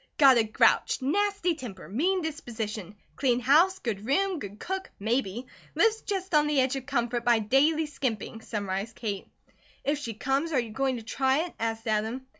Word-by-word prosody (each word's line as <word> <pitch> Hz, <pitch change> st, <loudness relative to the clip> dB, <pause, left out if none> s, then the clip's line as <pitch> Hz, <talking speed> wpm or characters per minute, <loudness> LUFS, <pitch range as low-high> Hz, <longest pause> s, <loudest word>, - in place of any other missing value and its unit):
"Got 270 Hz, -4 st, +7 dB
a -, -, +4 dB
grouch, 220 Hz, 0 st, +3 dB
nasty 400 Hz, +4 st, +1 dB
temper, 225 Hz, -, -9 dB
mean 345 Hz, -, 0 dB
disposition; 220 Hz, -, -5 dB, 0.2 s
clean 250 Hz, -3 st, +2 dB
house, 315 Hz, +10 st, +4 dB
good 215 Hz, -, -4 dB
room, 370 Hz, -, +1 dB
good 200 Hz, -4 st, -8 dB
cook 380 Hz, +1 st, -4 dB
maybe; 230 Hz, +1 st, -1 dB, 0.3 s
lives 445 Hz, 0 st, +3 dB
just 380 Hz, -3 st, -4 dB
on 300 Hz, 0 st, +5 dB
the 295 Hz, -2 st, +2 dB
edge 260 Hz, +1 st, +2 dB
of 270 Hz, 0 st, -6 dB
comfort 240 Hz, -3 st, -1 dB
by 240 Hz, 0 st, +4 dB
daily 275 Hz, +9 st, +3 dB
skimping," 235 Hz, -6 st, -4 dB
summarized 205 Hz, 0 st, -4 dB
Kate. 205 Hz, -4 st, -4 dB, 0.6 s
"If 290 Hz, +1 st, 0 dB
she 235 Hz, -7 st, -5 dB
comes, 275 Hz, +7 st, -1 dB
are 265 Hz, -, +3 dB
you 235 Hz, -3 st, -4 dB
going 265 Hz, +2 st, 0 dB
to 230 Hz, -, -8 dB
try 265 Hz, +6 st, +1 dB
it?" 350 Hz, -, -9 dB
asked 225 Hz, 0 st, -3 dB
Adam. 220 Hz, +4 st, -1 dB
260 Hz, 180 wpm, -28 LUFS, 225-305 Hz, 0.6 s, Got